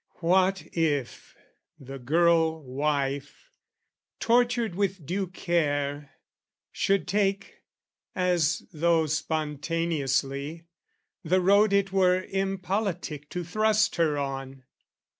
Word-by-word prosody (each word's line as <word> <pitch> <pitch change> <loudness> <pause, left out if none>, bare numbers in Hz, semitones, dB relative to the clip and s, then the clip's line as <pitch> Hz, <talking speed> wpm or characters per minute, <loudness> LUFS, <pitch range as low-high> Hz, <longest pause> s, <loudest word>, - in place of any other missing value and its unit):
What 185 +2 +2
if 150 -6 -2 0.4
the 135 0 -9
girl 160 +3 +2
wife, 140 - -3 0.7
tortured 240 -3 +2
with 190 -3 -2
due 190 +5 -2
care, 145 -5 -1 0.6
Should 195 -1 0
take, 195 +1 -1 0.6
as 175 -4 +1
though 165 0 +2
spontaneously, 150 -1 -2 0.6
the 180 +3 +2
road 200 +3 +4
It 200 -1 +2
were 185 -1 +3
impolitic 190 -6 -3
to 180 - -4
thrust 215 +4 +1
her 155 -3 +2
on? 135 -1 -5
170 Hz, 90 wpm, -27 LUFS, 145-195 Hz, 0.7 s, road